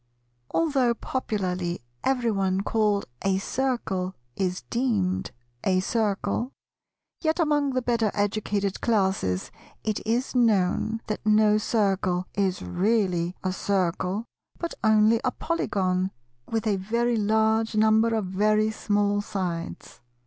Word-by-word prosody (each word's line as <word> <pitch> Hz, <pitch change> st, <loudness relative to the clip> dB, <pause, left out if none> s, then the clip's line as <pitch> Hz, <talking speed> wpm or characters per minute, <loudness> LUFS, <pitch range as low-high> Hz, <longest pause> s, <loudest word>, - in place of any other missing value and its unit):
Although 270 Hz, -7 st, +2 dB
popularly 185 Hz, -9 st, -2 dB, 0.2 s
everyone 205 Hz, -7 st, +1 dB
called 210 Hz, -1 st, +1 dB, 0.2 s
a 195 Hz, -1 st, +1 dB
Circle 195 Hz, -5 st, -2 dB, 0.2 s
is 185 Hz, -1 st, -2 dB
deemed 215 Hz, -7 st, 0 dB, 0.3 s
a 185 Hz, -1 st, +3 dB
Circle, 220 Hz, +4 st, -1 dB, 0.7 s
yet 315 Hz, +1 st, +1 dB
among 295 Hz, -4 st, +2 dB
the 255 Hz, -1 st, 0 dB
better 235 Hz, -3 st, +1 dB
educated 205 Hz, -1 st, -1 dB
Classes 190 Hz, -, 0 dB, 0.3 s
it 215 Hz, -1 st, -1 dB
is 235 Hz, +4 st, 0 dB
known 225 Hz, -2 st, +2 dB
that 215 Hz, -, -4 dB
no 215 Hz, 0 st, +4 dB
Circle 195 Hz, -5 st, +1 dB
is 190 Hz, -, 0 dB
really 180 Hz, -, +1 dB
a 185 Hz, 0 st, 0 dB
Circle, 190 Hz, +2 st, -1 dB, 0.3 s
but 340 Hz, -, -4 dB
only 220 Hz, +1 st, +4 dB
a 255 Hz, -, +2 dB
Polygon 190 Hz, -, -1 dB, 0.4 s
with 225 Hz, 0 st, -1 dB
a 205 Hz, -3 st, +2 dB
very 235 Hz, +5 st, 0 dB
large 220 Hz, +1 st, +2 dB
number 220 Hz, +1 st, +4 dB
of 215 Hz, -3 st, 0 dB
very 215 Hz, +3 st, +2 dB
small 205 Hz, -1 st, +1 dB
sides. 175 Hz, -9 st, -5 dB
210 Hz, 115 wpm, -26 LUFS, 190-230 Hz, 0.7 s, no